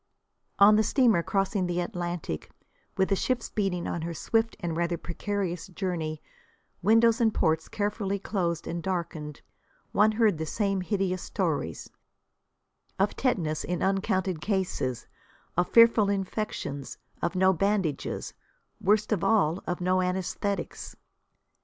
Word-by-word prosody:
On 205 +1 +7
the 220 - +4
steamer 230 -6 +3
crossing 195 +1 0
the 175 0 -1
Atlantic, 175 - -4 0.5
with 190 -1 +2
the 195 - +3
ship 245 +4 0
speeding 190 -4 -2
on 170 - -3
her 170 +1 -4
swift 225 +8 0
and 170 -4 -3
rather 170 +1 0
precarious 180 0 -3
journey 170 -5 -3 0.6
windows 225 +4 +4
and 225 -1 +4
ports 160 -5 +1
carefully 205 -1 -1
closed 175 -5 -2
and 170 0 -3
darkened, 165 -5 -4 0.5
one 215 +2 +4
heard 215 -7 +2
the 160 - -2
same 195 -1 0
hideous 185 -2 -1
stories: - - -2 1.1
of - - +1
tetanus 165 - 0
in 180 0 -2
uncounted 190 -3 0
cases, 185 - -1 0.5
of 180 +1 +1
fearful 230 -3 +6
infections, 195 -8 -3 0.2
of 170 +3 -1
no 190 +1 +4
bandages 190 -4 -1 0.5
worst 210 +3 +2
of 205 -5 +1
all, 190 -5 +2
of 180 0 -2
no 185 +1 +2
anæsthetics. 185 +2 -2
190 Hz, 130 wpm, -28 LUFS, 170-205 Hz, 1.1 s, On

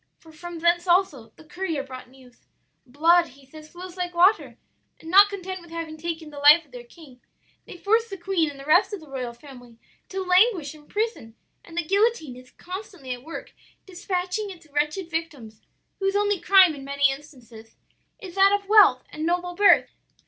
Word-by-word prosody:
for 325 - -18
from 345 +2 -9
thence 345 +2 +1
also, 345 -10 +1
the - - -17
courier 325 -3 -4
brought 255 -2 -11
news. 255 -1 -21 0.4
Blood, 335 +6 +3
he 275 +1 -19
says, 310 +3 -14
flows 360 +1 -11
like 355 -1 -4
water, 375 +5 +2 0.4
and 325 - -10
not 400 +2 +7
content 375 -2 -7
with 345 - -16
having 330 -1 -6
taken 320 -1 -6
the 290 - -9
life 295 +4 +6
of - - -29
their - - -10
king, 305 - -17 0.5
they - - -10
force 450 +5 +1
the 390 - -7
queen 345 -3 -1
and 280 -1 -11
the 275 - -10
rest 355 +7 +3
of - - -11
the 315 - -16
royal 255 -3 -5
family 245 -3 -15 0.3
to 385 0 -4
languish 365 -4 +2
in 300 -1 -18
prison; 420 - -4 0.3
and 335 0 -14
the 345 - -1
guillotine 395 - 0
is 255 0 -15
constantly 360 -8 -8
at 245 - -10
work 325 +3 -9 0.3
dispatching 370 +2 -4
its 350 -4 -12
wretched 300 +5 -1
victims, 290 -10 -6 0.4
whose 390 0 -1
only 410 -2 0
crime, 380 -4 +6
in 280 -2 -10
many 280 0 +1
instances, 250 -6 -13 0.4
is 370 -3 -10
that 390 +1 +4
of 400 - -23
wealth 400 -12 +5
and 305 - -6
noble 355 +1 -1
birth.' 405 +3 +4
335 Hz, 190 wpm, -24 LUFS, 280-380 Hz, 0.5 s, not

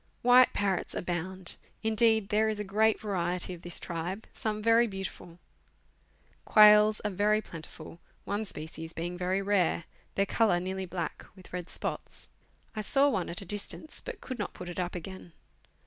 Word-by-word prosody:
White 250 +1 +7
parrots 195 -3 -1
abound. 180 +1 -3 0.3
Indeed, 220 -1 +3
there 215 +1 +2
is 215 -1 -3
a - - -1
great 215 +2 +2
variety 180 -3 -2
of 170 - -10
this 175 0 +1
tribe, 175 +5 -5
some 215 -1 -3
very 230 +1 +5
beautiful. 195 -4 -7 1.1
Quill 210 0 +7
are - - +2
very 210 +3 +2
plentiful, 165 -3 -10 0.3
one 205 +2 -2
species 160 -2 -6
being 175 +2 -4
very 185 +2 -1
rare; 190 -4 +1 0.3
their 200 - +2
colour 205 -3 +2
nearly 190 +1 -4
black, 175 -1 -5
with 185 -2 -16
red 180 -1 -5
spots. - - -5 0.5
I 215 - -2
saw 275 +7 +4
one 190 -9 -1
at 170 - -5
a - - -8
distance, 205 - -1
but - - -8
could 255 -3 -6
not 205 - -3
put 180 - -8
it 175 - -6
up 180 0 -2
again. 175 0 -8
195 Hz, 165 wpm, -29 LUFS, 175-215 Hz, 1.1 s, White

